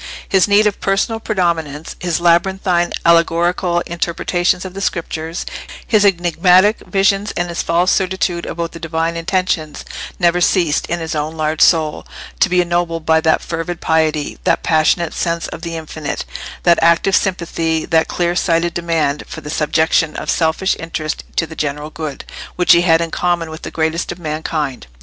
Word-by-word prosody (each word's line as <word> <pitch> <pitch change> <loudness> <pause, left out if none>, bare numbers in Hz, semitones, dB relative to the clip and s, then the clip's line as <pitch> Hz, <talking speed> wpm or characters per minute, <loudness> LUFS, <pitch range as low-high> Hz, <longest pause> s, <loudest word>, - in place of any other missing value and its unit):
His 190 0 +3
need 205 +1 +4
of 210 -2 0
personal 195 +3 0
predominance, 170 -8 -2
his 175 -2 -1
labyrinthine 175 +1 +2
allegorical 170 +1 +2
interpretations 175 +2 -1
of 185 - -7
the 195 - -6
Scriptures, 165 -2 -3 0.4
his 215 -2 +3
enigmatic 180 +2 +4
visions, 195 +1 +1
and 175 0 -1
his 170 - -2
false 175 +2 +2
certitude 185 -2 0
about 170 0 -4
the 165 - -10
Divine 165 0 -2
intentions, 165 -3 -2 0.3
never 175 -1 +2
ceased, 170 -4 +2
in 170 - -2
his 160 -1 -4
own 155 +1 -3
large 155 0 -1
soul, 160 -3 +3 0.3
to - - +4
be 180 0 +3
ennobled 170 -2 -1
by 160 0 +3
that 160 -1 +2
fervid 165 +1 -4
piety, 155 -2 0
that - - +1
passionate 160 +1 +2
sense 170 -1 -2
of - - -8
the 170 -1 -5
infinite, 155 -1 -5 0.4
that 170 -1 +4
active 170 +3 +4
sympathy, 165 -4 0
that 160 -1 +2
clear 175 0 -1
sighted 170 -1 +1
demand 165 -4 0
for - - -8
the 150 - -7
subjection 160 +1 +1
of - - -2
selfish 165 +4 +1
interests 160 -2 -4
to 165 - +1
the 160 0 -11
general 150 +1 -3
good, 155 -4 -6 0.3
which 180 +1 +3
he 170 -1 +7
had 165 -2 +4
in 165 -1 -3
common 175 -2 -1
with 160 - -8
the - - -6
greatest 160 +1 -1
of 175 - -7
mankind. 155 - -3
170 Hz, 170 wpm, -17 LUFS, 160-180 Hz, 0.4 s, he